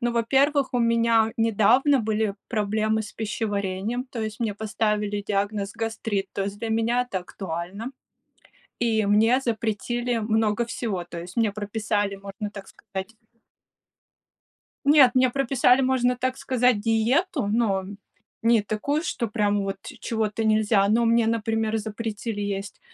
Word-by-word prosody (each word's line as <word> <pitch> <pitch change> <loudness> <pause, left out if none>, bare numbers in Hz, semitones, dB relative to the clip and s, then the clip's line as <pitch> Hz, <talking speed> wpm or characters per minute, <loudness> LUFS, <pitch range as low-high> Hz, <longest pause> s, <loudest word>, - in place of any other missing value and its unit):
Ну, 240 -1 0
во-первых, 270 +4 +2
у 245 - +3
меня 230 -1 +3
недавно 230 +6 +4
были 215 -2 0
проблемы 215 0 0
с 210 - -9
пищеварением, 210 +1 -2
то 235 - -5
есть 215 0 -5
мне 220 -3 -1
поставили 210 -1 -1
диагноз 200 0 -1
гастрит, 225 -3 -2
то 195 - -2
есть 200 +1 -4
для 230 - -4
меня 230 +2 +1
это 190 - -1
актуально. 185 +6 -6 0.9
И 225 -3 +1
мне 220 +5 +4
запретили 235 +1 -1
много 220 +1 +1
всего, 220 -6 -3
то 170 -1 -7
есть 180 +4 -11
мне 225 -3 +2
прописали, 205 -1 -2
можно 200 +1 -6
так 200 -2 -9
сказать 195 0 -8 1.7
Нет, 285 -3 +7
мне 255 -1 +4
прописали, 270 -1 +3
можно 255 -1 +2
так 255 +1 -1
сказать, 250 -4 +2
диету, 235 - +1
но 205 -3 +1 0.6
не 230 -1 +4
такую, 215 - -1
что 240 -8 -2
прям 205 -2 0
вот 195 0 -3 0.2
чего-то 220 -1 -1
нельзя. 215 -2 +3
Но 230 +2 +3
мне, 230 0 +3
например, 225 -1 0
запретили 220 0 -4
есть 200 -1 -4
220 Hz, 140 wpm, -25 LUFS, 205-235 Hz, 1.7 s, Нет